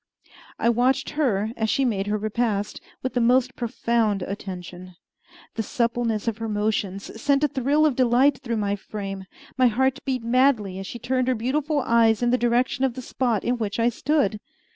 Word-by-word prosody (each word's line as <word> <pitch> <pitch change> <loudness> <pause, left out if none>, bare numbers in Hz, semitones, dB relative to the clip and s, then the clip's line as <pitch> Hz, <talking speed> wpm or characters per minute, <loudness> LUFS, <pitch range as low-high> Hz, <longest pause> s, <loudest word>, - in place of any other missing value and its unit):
I - - 0
watched 250 +4 +2
her, 225 -9 0
as 220 -1 -1
she 275 - +2
made 205 -5 -1
her 210 +1 0
repast, 215 -1 -2 0.2
with 260 - -2
the 245 - +1
most 255 +2 +3
profound 230 -4 0
attention. 185 -2 -7 0.6
The 225 - -2
suppleness 235 -1 -1
of 225 -1 -1
her 225 0 -3
motions 210 0 -2
sent 280 0 +2
a - - +5
thrill 280 +3 +1
of 295 -5 +2
delight 255 +2 +3
through 235 -4 -3
my 205 -1 0
frame; 195 -1 -6 0.3
my 255 - +6
heart 265 +4 +1
beat 255 -3 -2
madly 230 -6 +2
as 195 - -6
she - - -6
turned 255 +1 -1
her 255 - +2
beautiful 285 +6 0
eyes 230 -1 +3
in 240 - +2
the 250 - +3
direction 240 +2 +1
of 260 -3 +1
the 260 - -5
spot 235 -5 -1
in 245 0 0
which 210 0 -3
I 230 +1 +3
stood. 250 -4 0
235 Hz, 185 wpm, -24 LUFS, 210-255 Hz, 0.6 s, my